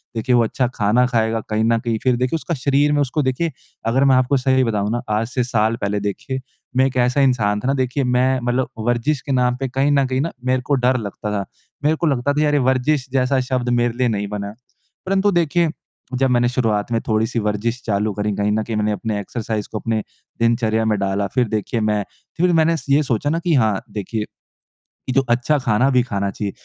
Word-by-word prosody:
देखिए 125 +3 +1
वो 120 - +5
अच्छा 125 +3 0
खाना 110 +4 +3
खाएगा 115 -2 +1
कहीं 110 0 +1
न 115 +1 +3
कहीं। 115 -1 -1
फ़िर 130 -2 +3
देखिए 125 +5 0
उसका 170 - -4
शरीर 140 +2 +2
में 145 - +2
उसको 145 +2 0
देखिए 135 +6 0 0.4
अगर 130 +4 +2
मैं 135 -1 +5
आपको 130 +2 +3
सही 130 0 +2
बताऊँ 105 -3 0
ना, 120 +1 -1
आज 110 +1 0
से 125 +1 -1
साल 115 -2 +1
पहले 100 0 -1
देखिए 105 +6 -3 0.4
मैं 130 - +5
एक 130 -1 -2
ऐसा 125 +3 +2
इंसान 110 -6 +2
था 125 - -4
ना 135 - +2
देखिए 130 +1 0
मैं 125 +1 +2
मतलब 120 0 0 0.2
वर्जिश 120 +4 +1
के 140 - -5
नाम 125 -1 +2
पे 135 - -1
कहीं 135 +3 +1
न 140 -1 +3
कहीं 130 +1 0
न 165 - -2
मेरे 130 0 +1
को 140 +2 0
डर 125 0 +2
लगता 105 -1 -5
था। 100 -2 -2 0.4
मेरे 155 +2 +3
को 165 - -1
लगता 140 -1 +1
था 150 - 0
यार 145 -1 +2
वर्जिश 130 +2 +1
जैसा 130 0 +2
शब्द 125 -1 0
मेरे 120 -1 +1
लिए 125 -1 +2
नहीं 105 -3 -1
बना। 100 0 -5 0.5
परंतु 195 +1 +2
देखिए 170 -1 +2 0.5
जब 135 +1 +2
मैंने 120 0 +3
शुरुआत 115 -4 0
में 115 - +2
थोड़ी-सी 110 +1 0
वर्जिश 110 +3 -2
चालू 105 0 0
करी। 105 +1 -1
कहीं 105 0 0
न 110 +1 0
कहीं 115 0 -4
मैंने 105 0 +1
अपने 105 +1 -2
एक्सरसाइज़ 110 +1 -4
को 110 - -3
अपने 110 0 -1 0.4
दिनचर्या 115 -1 +2
में 110 -1 +1
डाला, 100 +1 0
फ़िर 125 +4 0
देखिए 110 +2 -2
मैं 105 -1 +1 0.3
फ़िर 180 +1 +3
मैंने 165 0 +3
ये 145 +2 +4
सोचा 135 +1 -1
ना 165 +2 0
कि 170 -1 0
हाँ 110 -6 +2
देखिए 105 +1 -3 0.8
कि 130 - -1
जो 135 - +4
अच्छा 125 +5 +2
खाना 125 -1 +2
भी 125 -2 +4
खाना 100 -5 -2
चाहिए। 100 +1 -4
125 Hz, 225 wpm, -20 LUFS, 110-135 Hz, 0.8 s, वो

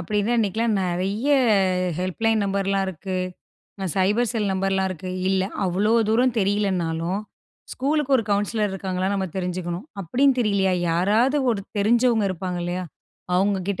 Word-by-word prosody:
அப்படின்னு 210 +5 -1
அன்னைக்குலாம் 220 +1 +1
நிறைய 190 +7 -2 0.7
ஹெல்ப்லைன் 220 +4 0
நம்பர்லாம் 195 0 0
இருக்கு, 190 +1 -5 0.8
சைபர் 210 +5 +2
செல் 210 -4 0
நம்பர்லாம் 190 0 0
இருக்கு, 185 +1 -6 0.2
இல்ல 190 -1 +2 0.2
அவ்வளோ 195 +5 +1 0.2
தூரம் 245 +2 +3
தெரியலைனாலும், 190 -3 0 0.5
ஸ்கூலுக்கு 280 +1 +1
ஒரு 225 - -1
கவுன்சிலர் 205 +1 0
இருக்காங்களா 190 -1 -2
நம்ம 190 -1 -1
தெரிஞ்சுக்கணும், 180 - -3 0.2
அப்படின்னு 260 - +2
தெரியலையா, 200 -4 +2 0.2
யாராவது 215 - +2 0.2
ஒரு 200 -3 -4 0.2
தெரிஞ்சவங்க 230 +1 +3
இருப்பாங்க 180 0 -4
இல்லையா? 180 +1 -3 0.5
அவங்க 195 +2 +2
கிட்ட 200 - -1
195 Hz, 125 wpm, -23 LUFS, 185-220 Hz, 0.8 s, தூரம்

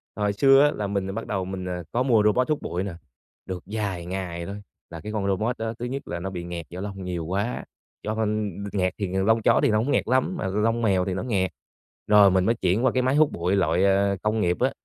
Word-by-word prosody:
hồi 105 0 0
xưa 135 +6 +6
á, 145 - +4
là 105 -8 -3
mình 100 -1 -2
bắt 115 - -5
đầu 95 -2 -2
mình 95 0 -5 0.3
có 125 - +1
mua 115 -5 +4
robot 115 +6 +2
hút 150 - 0
bụi 90 +2 -3
nè, 100 -2 -4 0.5
được 95 -2 -6
vài 100 -4 -3
ngày 90 -2 -4
thôi, 100 +3 -7 0.3
là 85 - -8
cái 105 - -6
con 105 -2 -2
robot 110 +5 0
đó 110 0 -3
thứ 120 - -3
nhất 135 +3 -5
là 85 - -4
nó 95 +3 -4
bị 90 -2 -5
nghẹt 85 -1 -6
do 90 +2 -7
lông 95 -1 -6
nhiều 90 -3 -3
quá, 100 +7 -2 0.4
do 110 +1 -2
con 105 -1 0 0.2
nghẹt 95 -2 +1
thì 100 - -2
lông 95 +5 +2
chó - - +4
thì - - +4
hổng 110 +6 +1
nghẹt - - +1
lắm 130 +9 +2
mà - - -2
lông 110 +4 0
mèo 95 -5 +2
thì 95 - -2
nó 95 - -3
nghẹt. 95 -7 0 0.6
Rồi 105 -2 +7
mình 95 0 +2
mới 115 - +2
chuyển 100 +3 +1
qua - - +4
cái 130 - +1
máy 130 +2 +2
hút 155 0 +4
bụi 90 +3 0
loại 85 -1 +2 0.4
công 105 +1 +1
nghiệp 90 -3 +1
á, - - +2
100 Hz, 250 wpm, -25 LUFS, 95-110 Hz, 0.6 s, Rồi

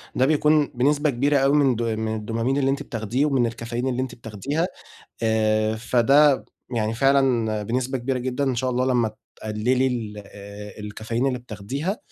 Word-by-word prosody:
ده 130 - +3
بيكون 150 0 +3
بنسبة 145 +4 +2
كبيرة 140 +3 +2
أوي 135 +1 +3
من 135 -4 +3
د 115 - -3
من 110 -1 -2
الDopamine 115 +4 0
اللي 135 -1 +2
أنتِ 140 - -2
بتاخديه 115 +5 -1
ومن 135 -5 +2
الكافيين 115 +2 -3
اللي 130 0 -1
أنتِ 130 -2 -4
بتاخديها 120 - -3 0.6
آآ، 110 -1 +2
فده 135 +5 +4 0.3
يعني 110 -1 0
فعلًا 120 -4 +2
بنسبة 130 +4 -1
كبيرة 125 +1 -2
جدًا 130 +3 -2
إن 135 -2 +1
شاء 130 +2 -1
الله 125 +1 0
لمّا 120 -4 +1 0.2
تقلّلي 120 +5 0
ال 110 -4 -3 0.7
الكافيين 115 +4 -2
اللي 125 -2 -1
بتاخديها، 125 - -4
125 Hz, 165 wpm, -23 LUFS, 110-135 Hz, 0.7 s, فده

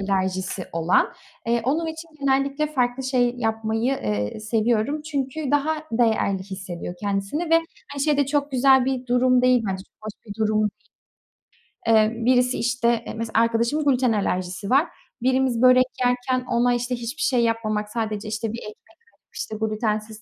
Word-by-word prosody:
alerjisi 190 -1 -1
olan. 165 +1 +2 0.3
Eee, 235 0 +1
onun 310 +6 0
için 320 +1 -7
genellikle 275 +2 +1
farklı 255 -3 -1
şey 250 -2 +1
yapmayı, 225 -1 -1
eee, 105 - -3
seviyorum. 225 +6 0
Çünkü 285 -1 -3
daha 305 +2 0
değerli 220 -4 +1
hissediyor 185 -2 -7
kendisini 205 - -2
ve - - +6 0.4
hani 280 -1 -3
şey 300 0 +2
de 285 -1 +2
çok 285 +1 0
güzel 265 0 +5
bir 255 -1 -2
durum 250 +1 +3
değil 250 -1 +4
bence, 190 -1 -3
çok - - -40
hoş 215 - -5
bir 205 - -7
durum 215 0 +2
değil. 210 -1 +1 1.2
Eee, 220 -1 +4
birisi 250 0 +3
işte, 240 0 0 0.2
eee, - - -6
mesela 225 0 0
arkadaşımın 235 +6 +1
gluten 255 -4 +3
alerjisi 190 -1 -2
var. 275 +6 +4 0.3
Birimiz 255 -2 +1
börek 255 0 +7 0.2
yerken 250 +1 0
ona 245 +1 +2
işte 245 +1 -2
hiçbir 240 +5 -5
şey 250 -3 +2
yapmamak, 215 -2 -1
sadece 215 -2 -3
işte 220 0 -3
bir 230 - -5
ekmek 210 -2 -9 0.4
alıp, - - -34
işte 220 - -5
glutensiz 215 0 -2
235 Hz, 165 wpm, -23 LUFS, 215-265 Hz, 1.2 s, börek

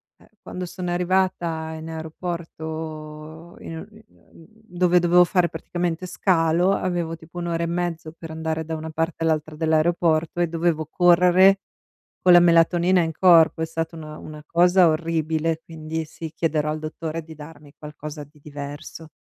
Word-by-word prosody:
eh, - - -23
quando 180 0 -6
sono 180 0 -5
arrivata 175 -3 0
in 160 +1 -8
aeroporto 160 -1 -7
in 165 - -8
uhm, 215 +6 -11
mhmm, 165 - -20 0.2
dove 180 -3 +2
dovevo 175 +1 +5
fare 175 -1 +1
praticamente 175 0 -3
scalo, 175 -1 +2
avevo, 175 -4 -2
tipo, 165 +2 -10
1 175 - -4
ora 170 0 -1
e - - 0
mezzo 170 -2 -3
per 165 -1 -9
andare 160 0 -3
da 160 +1 -4
una 160 +1 -6
parte 165 +1 -2
all'altra 155 -1 -1
dell'aeroporto 160 +1 +1
e 175 - +2
dovevo 165 -1 -1
correre 180 +3 +5 0.6
con 185 - +5
la 175 - +9
melatonina 175 +1 +4
in 165 -1 -1
corpo. 165 -1 +5
È - - +1
stata 165 +1 -4
una 155 -1 -9
una 150 -1 -10
cosa 180 +1 +5
orribile, 160 0 0
quindi, 160 0 -6
sì, 160 +1 -8
chiederò 155 -2 0
al 155 +1 -2
dottore 160 +1 -5
di 160 0 -12
darmi 150 -1 -13
qualcosa 150 0 -8
di 150 +1 -19
diverso. 145 +2 -9
165 Hz, 160 wpm, -23 LUFS, 155-175 Hz, 0.6 s, la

